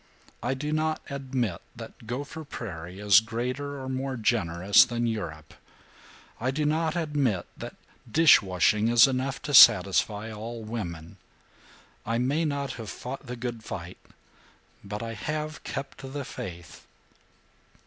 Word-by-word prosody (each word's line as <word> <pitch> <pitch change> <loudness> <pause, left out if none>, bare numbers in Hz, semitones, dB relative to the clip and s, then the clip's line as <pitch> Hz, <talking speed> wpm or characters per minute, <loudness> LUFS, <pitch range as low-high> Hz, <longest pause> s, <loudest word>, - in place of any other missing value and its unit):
I 130 +2 -1
do 150 +3 -4
not 155 0 0
admit 130 -9 -2
that 115 0 -11
Gopher 145 +6 -5
Prairie 90 - -7
is 105 -1 +7
greater 125 +5 -4
or 130 - -6
more 130 0 -3
generous 100 -4 +4
than 120 0 -2
Europe! 80 -9 -4 0.9
I 125 - -1
do 150 +3 -1
not 160 +2 +1
admit 145 - 0
that - - -8 0.4
dish 165 +3 +7
washing 100 +3 +2
is 115 -1 +7
enough 130 0 -2
to 145 - -4
satisfy 105 0 +6
all 115 +2 -7
women! 85 -8 -6 0.9
I 115 +1 -1
may 140 +7 +1
not 140 -2 -2
have 110 - -7
fought 130 +8 -7
the 125 - -5
good 120 -2 -5
fight, 90 -3 -7 0.8
but 105 +3 -5
I 115 0 -5
have 150 +8 -4
kept 140 - -6
the 135 +1 -6
faith." 85 -6 -9
120 Hz, 140 wpm, -27 LUFS, 105-140 Hz, 0.9 s, is